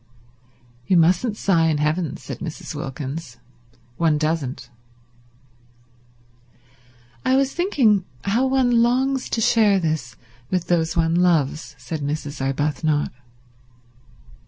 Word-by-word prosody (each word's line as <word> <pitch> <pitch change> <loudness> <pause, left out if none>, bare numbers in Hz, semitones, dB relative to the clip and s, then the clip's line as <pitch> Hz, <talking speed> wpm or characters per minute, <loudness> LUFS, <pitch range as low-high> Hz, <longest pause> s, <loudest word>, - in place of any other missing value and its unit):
"You 185 - +4
mustn't 185 +7 +3
sigh 170 -6 +2
in 155 -2 +1
heaven," 150 +1 -1
said - - -8
Mrs. 160 -3 -6
Wilkins. 140 -1 -6 0.6
"One 160 -3 +2
doesn't." 155 -4 -2 2.5
"I 260 - +3
was 270 0 +2
thinking 255 - +2 0.2
how 230 +7 +1
one 250 -3 +3
longs 260 +3 +1
to 225 - -1
share 210 -3 +4
this 155 -7 -2 0.3
with 180 -2 -1
those 165 -1 0
one 165 0 +2
loves," 170 -4 +1
said 160 -2 -6
Mrs. 145 0 -4
Arbuthnot. 145 +2 0
165 Hz, 110 wpm, -22 LUFS, 150-215 Hz, 2.5 s, You